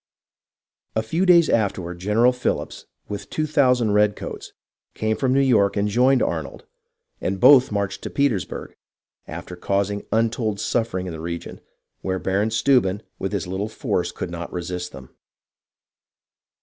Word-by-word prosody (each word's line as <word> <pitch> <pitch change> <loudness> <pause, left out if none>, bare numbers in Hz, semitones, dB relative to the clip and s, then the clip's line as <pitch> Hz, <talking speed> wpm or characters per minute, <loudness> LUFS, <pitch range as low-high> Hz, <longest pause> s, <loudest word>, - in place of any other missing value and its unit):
A 110 - +1
few 165 +12 0
days 170 -3 +7
afterward 95 -5 -1
General 105 +6 +3
Phillips, 125 - -3 0.2
with 100 -1 -6
2000 135 -7 +2
red 105 0 +3
coats, - - -7 0.4
came 110 0 0
from 130 +1 0
New 135 - +3
York 110 -8 +3
and 100 +1 +1
joined 125 +5 +3
Arnold, 80 -5 -4 0.6
and 95 +1 -2
both 130 +2 +7
marched 100 -1 -2
to - - -5
Petersburg, 135 -10 -1 0.5
after 90 - -7
causing 100 +2 -1
untold 110 -2 0
suffering 110 -6 -1
in 90 - -5
the 80 - -7
region, 85 0 -6 0.4
where 95 0 -1
Baron 95 +3 0
Steuben 110 -3 +2 0.2
with 95 - -2
his 100 -5 -2
little 95 +4 -3
force - - -2
could 90 - -6
not 85 0 -6
resist 90 0 -4
them. 65 -2 -12
105 Hz, 145 wpm, -23 LUFS, 95-120 Hz, 0.6 s, days